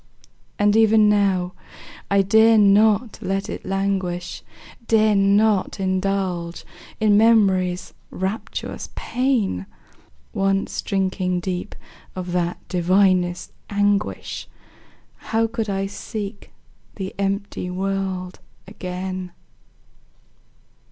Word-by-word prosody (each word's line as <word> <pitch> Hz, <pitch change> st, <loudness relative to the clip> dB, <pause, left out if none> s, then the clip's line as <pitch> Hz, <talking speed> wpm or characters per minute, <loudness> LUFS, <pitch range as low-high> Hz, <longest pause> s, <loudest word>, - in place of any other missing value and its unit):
And 205 Hz, 0 st, +3 dB
even 220 Hz, -1 st, +5 dB
now, 195 Hz, -3 st, +2 dB, 0.6 s
I 200 Hz, 0 st, +4 dB
dare 220 Hz, +3 st, +5 dB
not 210 Hz, +2 st, +4 dB
let 195 Hz, +1 st, -2 dB
it -, -, -6 dB
languish, 190 Hz, -2 st, -2 dB, 0.5 s
Dare 215 Hz, -1 st, +4 dB
not 200 Hz, 0 st, +2 dB
indulge 185 Hz, -2 st, -1 dB, 0.3 s
in 210 Hz, -1 st, +4 dB
Memory's 190 Hz, -5 st, +3 dB, 0.2 s
rapturous 190 Hz, +4 st, -4 dB
pain; 235 Hz, -, -1 dB, 0.7 s
Once 195 Hz, 0 st, 0 dB
drinking 185 Hz, -2 st, -1 dB
deep 180 Hz, -1 st, -4 dB, 0.4 s
of 180 Hz, -1 st, -5 dB
that 175 Hz, -1 st, -1 dB
divinest 180 Hz, 0 st, +2 dB, 0.2 s
anguish, 205 Hz, 0 st, -1 dB, 0.7 s
How 225 Hz, 0 st, 0 dB
could 225 Hz, -1 st, -3 dB
I 195 Hz, 0 st, -1 dB
seek 205 Hz, 0 st, -6 dB, 0.5 s
the 190 Hz, -2 st, -5 dB
empty 200 Hz, -2 st, -2 dB
world 190 Hz, -1 st, -3 dB, 0.3 s
again? 185 Hz, -1 st, -5 dB
195 Hz, 90 wpm, -22 LUFS, 185-210 Hz, 0.7 s, even